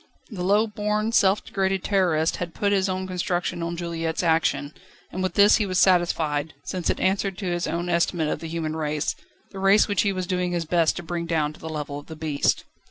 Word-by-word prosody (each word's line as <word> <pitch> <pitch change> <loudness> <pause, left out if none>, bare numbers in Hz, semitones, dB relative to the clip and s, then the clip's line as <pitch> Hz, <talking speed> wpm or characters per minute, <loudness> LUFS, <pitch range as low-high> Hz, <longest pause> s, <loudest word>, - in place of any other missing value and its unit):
The 195 -5 -5
low 205 +4 +3
born, 210 +1 -1
self 195 -2 +3
degraded 195 -3 -1
Terrorist 175 -5 +1
had 175 -2 -5
put 200 -1 +1
his 195 -1 +2
own 185 0 -2
construction 180 -1 -2
on 170 0 -3
Juliette's 165 -1 -2
action, 160 -3 +1 0.4
and 185 - -4
with 185 -2 -2
this 205 +1 +6
he 210 - 0
was 185 -1 -1
satisfied, 160 -5 +2
since 180 +1 -3
it - - 0
answered 195 0 0
to 195 - -5
his 175 0 -1
own 170 +2 -2
estimate 170 -2 +1
of - - -2
the 165 - -6
human 160 -1 -3
race, 150 -2 -1 0.4
the 195 - -8
race 195 +2 +5
which 205 -3 +1
he 200 - +1
was 185 -1 -3
doing 180 -1 -1
his 170 -1 -1
best 165 -1 +2
to 175 - -6
bring 170 0 -4
down 155 -3 0
to - - -16
the 160 - -7
level 150 -2 -4
of 145 - -15
the 160 - -8
beast. 155 -2 0
175 Hz, 225 wpm, -24 LUFS, 160-190 Hz, 0.4 s, this